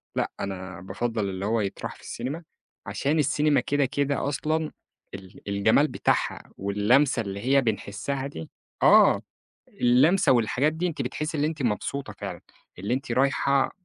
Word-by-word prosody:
لأ -, -, -1 dB
أنا 95 Hz, -2 st, -5 dB
بافضَّل 100 Hz, +2 st, -2 dB
اللي 95 Hz, +1 st, -4 dB
هو 115 Hz, +1 st, +1 dB
يتراح 100 Hz, -2 st, -4 dB
في -, -, -18 dB
السينما، 140 Hz, +8 st, -5 dB, 0.4 s
عشان 140 Hz, +10 st, 0 dB
السينما 150 Hz, +1 st, +3 dB
كده، 145 Hz, -1 st, +1 dB
كده 140 Hz, +1 st, -1 dB
أصلًا 155 Hz, +2 st, -1 dB, 0.4 s
ال 95 Hz, -1 st, -11 dB
الجمال 110 Hz, +9 st, +3 dB
بتاعها -, -, -1 dB
واللمسة 115 Hz, +7 st, +2 dB
اللي 100 Hz, -1 st, -5 dB
هي 135 Hz, +3 st, +3 dB
بنحسَّها 115 Hz, +4 st, -2 dB
دي، 80 Hz, -, -8 dB, 0.3 s
آه، -, -, +6 dB, 0.5 s
اللمسة 135 Hz, +8 st, +4 dB
والحاجات 125 Hz, +5 st, +2 dB
دي 165 Hz, +3 st, -2 dB
أنتِ 155 Hz, -5 st, -3 dB
بتحسِّي 155 Hz, +6 st, -3 dB
اللي 150 Hz, +1 st, +1 dB
أنتِ 155 Hz, -3 st, -4 dB
مبسوطة 125 Hz, +5 st, -2 dB
فعلًا، -, -, -6 dB, 0.4 s
اللي 100 Hz, +7 st, -1 dB
أنتِ 130 Hz, -2 st, -3 dB
رايحة 135 Hz, +1 st, +2 dB
130 Hz, 145 wpm, -26 LUFS, 100-145 Hz, 0.5 s, آه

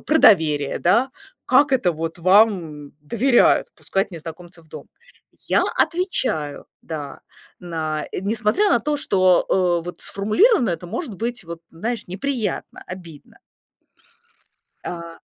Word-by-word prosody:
про 315 Hz, +1 st, +3 dB
доверие, 150 Hz, -8 st, +4 dB
да: 240 Hz, +9 st, +2 dB, 0.4 s
"Как 270 Hz, +2 st, +4 dB
это 185 Hz, -9 st, +2 dB
вот 165 Hz, +2 st, -5 dB
вам 180 Hz, -6 st, +2 dB
доверяют- 235 Hz, -, +3 dB
пускать 195 Hz, +1 st, -2 dB
незнакомцев 170 Hz, +1 st, -10 dB
в -, -, -28 dB
дом?" -, -, -10 dB, 0.6 s
Я -, -, +3 dB
отвечаю, 255 Hz, -, -1 dB, 0.2 s
да. 150 Hz, -3 st, -7 dB, 0.4 s
На, 160 Hz, -3 st, -3 dB
э, -, -, -3 dB
несмотря 220 Hz, -, +1 dB
на -, -, +4 dB
то, 300 Hz, 0 st, -1 dB
что, 185 Hz, -7 st, +3 dB, 0.4 s
э, -, -, -12 dB
вот 175 Hz, -, -8 dB
сформулировано 220 Hz, -, +2 dB
это 175 Hz, +1 st, -4 dB
может 230 Hz, -, -5 dB
быть 235 Hz, -1 st, -4 dB
вот 170 Hz, 0 st, -8 dB
неприятно, 220 Hz, +3 st, -4 dB
обидно. 170 Hz, -5 st, -11 dB, 1.5 s
А. 170 Hz, -1 st, -7 dB
185 Hz, 120 wpm, -21 LUFS, 165-235 Hz, 1.5 s, доверие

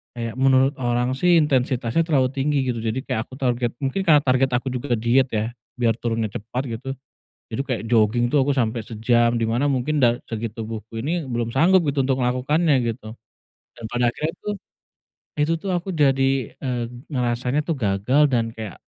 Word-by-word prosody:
kayak 115 Hz, -1 st, -4 dB
menurut 135 Hz, +1 st, +4 dB
orang 120 Hz, +1 st, +1 dB
sih 175 Hz, +6 st, +3 dB
intensitasnya 130 Hz, -2 st, +1 dB
terlalu 135 Hz, -5 st, +3 dB
tinggi, 140 Hz, +1 st, 0 dB
gitu, 115 Hz, -, -4 dB
jadi 115 Hz, +3 st, -1 dB
kayak -, -, -1 dB
aku -, -, -16 dB
target. 120 Hz, -2 st, 0 dB
Mungkin 135 Hz, +9 st, 0 dB
karena 150 Hz, -3 st, +7 dB
target 130 Hz, 0 st, +2 dB
aku 130 Hz, +2 st, -2 dB
juga 125 Hz, 0 st, -1 dB
ke -, -, -4 dB
diet, 125 Hz, +3 st, +3 dB
ya, 110 Hz, 0 st, -2 dB, 0.3 s
biar 115 Hz, -2 st, +2 dB
turunnya 115 Hz, -2 st, -1 dB
cepat, 120 Hz, +6 st, -4 dB
gitu, 120 Hz, +2 st, -6 dB, 0.6 s
jadi 115 Hz, +3 st, -3 dB
kayak 125 Hz, -4 st, -2 dB
joging 120 Hz, +1 st, +3 dB
tuh 145 Hz, -, +4 dB
aku 145 Hz, -, +2 dB
sampai 115 Hz, -2 st, 0 dB
sejam, 120 Hz, +1 st, +2 dB
di 115 Hz, -, 0 dB
mana 120 Hz, +6 st, +1 dB
mungkin 140 Hz, +3 st, 0 dB
dari 120 Hz, -2 st, +4 dB
segi 115 Hz, 0 st, -3 dB
tubuhku 110 Hz, 0 st, -7 dB
ini 165 Hz, +7 st, -1 dB
belum 120 Hz, -1 st, -2 dB
sanggup, 180 Hz, +7 st, +5 dB
gitu, 140 Hz, 0 st, -1 dB
untuk 135 Hz, -1 st, +1 dB
melakukannya, 140 Hz, +5 st, +2 dB, 0.2 s
gitu, 110 Hz, -1 st, -12 dB, 0.7 s
dan 115 Hz, -, -11 dB
pada 120 Hz, 0 st, +2 dB
akhirnya 155 Hz, +6 st, -3 dB
itu 210 Hz, -, -6 dB, 0.9 s
itu 150 Hz, +3 st, +2 dB
tuh 190 Hz, +4 st, -5 dB
aku 180 Hz, +2 st, -2 dB
jadi, 135 Hz, -4 st, +2 dB
eee, 125 Hz, -3 st, -2 dB, 0.2 s
ngerasanya 125 Hz, +1 st, -1 dB
tuh 165 Hz, -, -1 dB
gagal 115 Hz, +7 st, +2 dB
dan 115 Hz, -4 st, 0 dB
kayak 110 Hz, -4 st, -7 dB
125 Hz, 185 wpm, -22 LUFS, 115-140 Hz, 0.9 s, karena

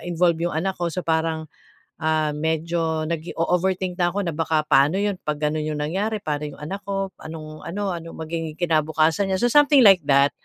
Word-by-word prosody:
involve 170 Hz, -1 st, +1 dB
'yung 160 Hz, -, -4 dB
anak 190 Hz, +4 st, 0 dB
ko 175 Hz, -, +1 dB
so 180 Hz, +2 st, -4 dB
parang, 160 Hz, -1 st, 0 dB, 0.6 s
ah, 155 Hz, -1 st, +1 dB
medyo 160 Hz, +1 st, -1 dB
nag-o-overthink 175 Hz, +3 st, -1 dB
na 175 Hz, -, +3 dB
ako 205 Hz, -, 0 dB
na 170 Hz, -, -2 dB
baka 160 Hz, 0 st, 0 dB
paano 145 Hz, +2 st, +4 dB
'yun 200 Hz, -1 st, -1 dB
'pag 150 Hz, 0 st, -2 dB
gano'n 150 Hz, +1 st, +1 dB
'yung 155 Hz, -, -2 dB
nangyari, 205 Hz, +7 st, -2 dB
paano 150 Hz, 0 st, -2 dB
'yung -, -, -9 dB
anak 195 Hz, +6 st, -4 dB
ko, 195 Hz, -1 st, -2 dB
anong 155 Hz, -1 st, -9 dB
ano, 195 Hz, +2 st, -2 dB
ano 165 Hz, -1 st, -7 dB
magiging 160 Hz, -1 st, -5 dB
kinabukasan 160 Hz, +2 st, +1 dB
niya. 190 Hz, -, 0 dB
So 240 Hz, -, +3 dB
something 290 Hz, -1 st, +6 dB
like 195 Hz, -4 st, +8 dB
that 140 Hz, 0 st, +4 dB
165 Hz, 190 wpm, -23 LUFS, 155-185 Hz, 0.6 s, like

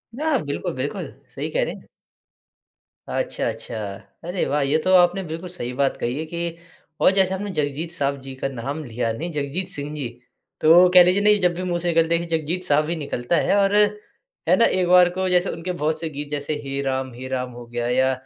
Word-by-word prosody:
नया 305 Hz, +1 st, +1 dB
बिल्कुल, 145 Hz, -1 st, -3 dB
बिल्कुल। 130 Hz, +2 st, -4 dB, 0.2 s
सही -, -, -5 dB
कह -, -, +1 dB
रहे -, -, -3 dB
हैं। -, -, -14 dB, 1.2 s
अच्छा, -, -, -2 dB
अच्छा। 120 Hz, -, -7 dB, 0.5 s
अरे 180 Hz, +1 st, -1 dB
वाह! 145 Hz, +2 st, 0 dB
ये 140 Hz, +3 st, +2 dB
तो 185 Hz, -, +2 dB
आपने 180 Hz, +1 st, +4 dB
बिल्कुल 165 Hz, +2 st, -6 dB
सही 150 Hz, -9 st, -5 dB
बात 135 Hz, +1 st, +1 dB
कही 120 Hz, +1 st, -2 dB
है 160 Hz, -, -3 dB
कि 170 Hz, +1 st, -4 dB, 0.4 s
और -, -, +6 dB
जैसे 190 Hz, -1 st, +4 dB
आपने 200 Hz, +2 st, -4 dB
जगजीत 150 Hz, +3 st, -2 dB
साहब 140 Hz, -4 st, -1 dB
जी 135 Hz, 0 st, -8 dB
का 130 Hz, -, -2 dB
नाम 135 Hz, +4 st, -5 dB
लिया 115 Hz, -2 st, -2 dB
नहीं 165 Hz, +10 st, -5 dB
जगजीत 150 Hz, +5 st, -3 dB
सिंह 145 Hz, +1 st, -5 dB
जी। 145 Hz, -4 st, -3 dB, 0.5 s
तो 170 Hz, +3 st, +7 dB
कह 180 Hz, -1 st, +10 dB
लीजिए 180 Hz, +3 st, +3 dB
नहीं 210 Hz, 0 st, +5 dB
जब 180 Hz, -1 st, +3 dB
भी 180 Hz, -, -4 dB
मुँह 175 Hz, -1 st, -1 dB
से 175 Hz, -, -3 dB
निकलते 165 Hz, 0 st, +3 dB
है 170 Hz, -, -3 dB
जगजीत 165 Hz, +2 st, -2 dB
साहब 150 Hz, -2 st, +2 dB
ही 170 Hz, -, -1 dB
निकलता 145 Hz, -1 st, -2 dB
है 195 Hz, -, +2 dB
और, 200 Hz, 0 st, +3 dB, 0.7 s
है -, -, +7 dB
ना? 230 Hz, -, +4 dB
एक 185 Hz, -1 st, +1 dB
बार 180 Hz, 0 st, +6 dB
को 185 Hz, +1 st, -2 dB
जैसे 180 Hz, +1 st, +3 dB
उनके 175 Hz, +2 st, -4 dB
बहुत 155 Hz, -2 st, -1 dB
से 165 Hz, -1 st, -3 dB
गीत 145 Hz, -1 st, -7 dB
जैसे 145 Hz, +1 st, -2 dB
हे 140 Hz, 0 st, -3 dB
राम, 130 Hz, -1 st, -2 dB
हे 125 Hz, +2 st, -8 dB
राम 130 Hz, -1 st, -3 dB
हो 120 Hz, 0 st, -10 dB
गया 120 Hz, 0 st, -3 dB
या 130 Hz, +2 st, +2 dB
160 Hz, 220 wpm, -22 LUFS, 135-180 Hz, 1.2 s, कह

